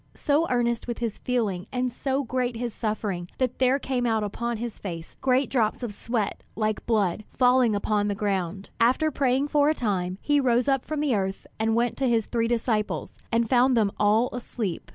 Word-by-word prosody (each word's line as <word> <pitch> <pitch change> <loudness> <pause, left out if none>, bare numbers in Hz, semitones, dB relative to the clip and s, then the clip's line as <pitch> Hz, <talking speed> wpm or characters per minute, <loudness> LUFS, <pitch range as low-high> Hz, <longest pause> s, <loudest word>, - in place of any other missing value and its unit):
So 300 +3 +1
earnest 235 -1 0
was 240 - -3
his 230 -3 -3
feeling 210 -7 -1
and 250 -1 -1
so 270 +2 -1
great 250 -1 -1
his 235 -1 -3
suffering 205 -6 -3
that 255 -2 -1
there 260 +1 +4
came 255 -3 -1
out 220 -2 +1
upon 235 +3 -3
his 235 -1 -5
face 170 -4 -7
great 260 +1 +3
drops 230 -1 0
of 225 -4 -3
sweat 220 0 -2
like 215 -1 -1
blood, 210 -4 +1
falling 250 -3 +4
upon 205 0 0
the 205 - -1
ground. 195 -2 -2
After 260 +7 +3
praying 270 +1 +1
for 295 0 +4
a 310 - +2
time, 185 -7 -1
he 290 +4 +2
rose 245 -2 +2
up 270 -2 +1
from 305 -1 -2
the 290 -4 +1
earth 195 -2 -2
and 220 0 +1
went 235 0 +1
to 265 -2 +1
his 225 -2 +2
three 230 -1 0
disciples, 225 -2 -1 0.2
and 230 0 +2
found 250 +1 +4
them 210 -3 +3
all 215 +4 +3
asleep. 225 -7 -4
235 Hz, 195 wpm, -26 LUFS, 210-255 Hz, 0.2 s, there